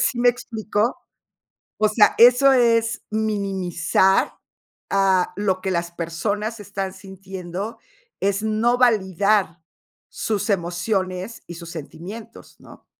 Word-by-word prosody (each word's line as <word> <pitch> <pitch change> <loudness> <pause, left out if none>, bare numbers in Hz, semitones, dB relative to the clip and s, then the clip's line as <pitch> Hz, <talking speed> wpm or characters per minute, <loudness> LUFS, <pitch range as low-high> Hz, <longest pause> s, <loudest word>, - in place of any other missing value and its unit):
¿Sí 240 +1 +1
me 245 0 +4
explico? 220 -1 -2 0.8
O 215 - +3
sea, 215 0 +4
eso 245 +3 +7
es 230 -2 +2
minimizar 195 -4 +1 0.6
a 190 -2 +2
lo 190 -3 0
que 190 0 -2
las 170 -1 -2
personas 205 +7 -3
están 195 -2 -5
sintiendo. 190 +1 -7 0.4
Es 200 +1 +1
no 220 +3 +1
validar 200 -6 +2 0.5
sus 215 0 -2
emociones 185 +3 -2
y 175 - -7
sus 170 0 -9
sentimientos, 190 +8 -10
¿no? - - -16
200 Hz, 110 wpm, -22 LUFS, 185-220 Hz, 0.8 s, eso